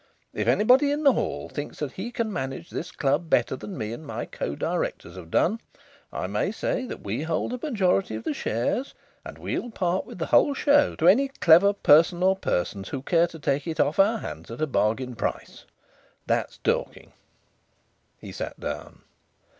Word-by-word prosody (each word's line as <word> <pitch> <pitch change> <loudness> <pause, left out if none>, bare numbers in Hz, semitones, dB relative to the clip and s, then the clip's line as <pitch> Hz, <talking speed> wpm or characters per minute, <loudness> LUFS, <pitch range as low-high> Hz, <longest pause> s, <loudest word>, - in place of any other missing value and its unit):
If - - -2
anybody 255 +7 +5
in 295 +2 -1
the 275 -3 +6
hall - - -2
thinks 145 0 -6 0.2
he 220 +6 -5
can 230 -3 -2
manage 135 -1 -5
this 175 +2 -5
club 150 +3 0
better 120 -1 +2
than 185 +7 -8
me 110 -2 -4
and 135 - -8
my 145 - -5
co 70 - -4
Directors - - -3
have 90 -3 -10
done, 215 - +1 0.5
I - - -3
may - - -1
say 255 - -2
that - - -8
we 105 +7 -3
hold 165 +9 -2
a 250 - -4
majority 195 - +1
of 110 - -6
the 150 - -1
shares, 130 - -2 0.3
and - - -9
we'll 245 - -3
part 185 -4 -1
with - - -10
the 165 - -2
whole 285 - +4
show 290 +1 +3
to 165 - +1
any 250 +10 +6
clever 195 -6 +5
person 175 -1 +4
or 190 +1 +4
persons 95 - -2
who 135 -2 -5
care 170 +2 +3
to 165 - -11
take 140 -1 -1
it 160 - -4
off 150 - +1
our 210 +4 +5
hands 80 - -8
at 115 - -8
a 155 - +2
bargain 125 -1 0
price. 115 - -4 0.6
That's - - -1
talking." - - -2 1.1
He - - -10
sat - - -6
down. - - -6
170 Hz, 185 wpm, -25 LUFS, 135-220 Hz, 1.1 s, the